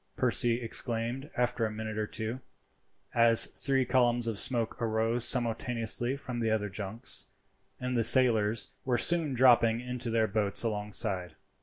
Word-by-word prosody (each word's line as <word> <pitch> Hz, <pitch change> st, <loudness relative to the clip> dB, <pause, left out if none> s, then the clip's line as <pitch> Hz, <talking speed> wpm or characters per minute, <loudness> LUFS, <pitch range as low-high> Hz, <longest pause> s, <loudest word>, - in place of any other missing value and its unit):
Percy 120 Hz, -1 st, +1 dB
exclaimed 120 Hz, +3 st, -1 dB
after 125 Hz, -1 st, -2 dB
a 110 Hz, -, -1 dB
minute 110 Hz, 0 st, -7 dB
or 105 Hz, -, -3 dB
two, 110 Hz, +4 st, -5 dB, 0.7 s
as 115 Hz, -1 st, +7 dB
three 135 Hz, -2 st, -1 dB
columns 120 Hz, -1 st, 0 dB
of 110 Hz, -3 st, -2 dB
smoke 120 Hz, -2 st, -1 dB
arose 115 Hz, +1 st, 0 dB
simultaneously 120 Hz, +1 st, +1 dB
from 125 Hz, -4 st, -8 dB
the 115 Hz, -1 st, -2 dB
other 105 Hz, -2 st, -2 dB
junks, 100 Hz, +3 st, -1 dB, 0.5 s
and 125 Hz, 0 st, -4 dB
the 115 Hz, -, 0 dB
sailors 115 Hz, -3 st, +3 dB
were 125 Hz, -2 st, -1 dB
seen 160 Hz, 0 st, 0 dB
dropping 120 Hz, -2 st, +3 dB
into 125 Hz, -1 st, -6 dB
their 115 Hz, -1 st, 0 dB
boats 105 Hz, 0 st, -2 dB
alongside. 105 Hz, -4 st, -3 dB
115 Hz, 145 wpm, -28 LUFS, 110-125 Hz, 0.7 s, as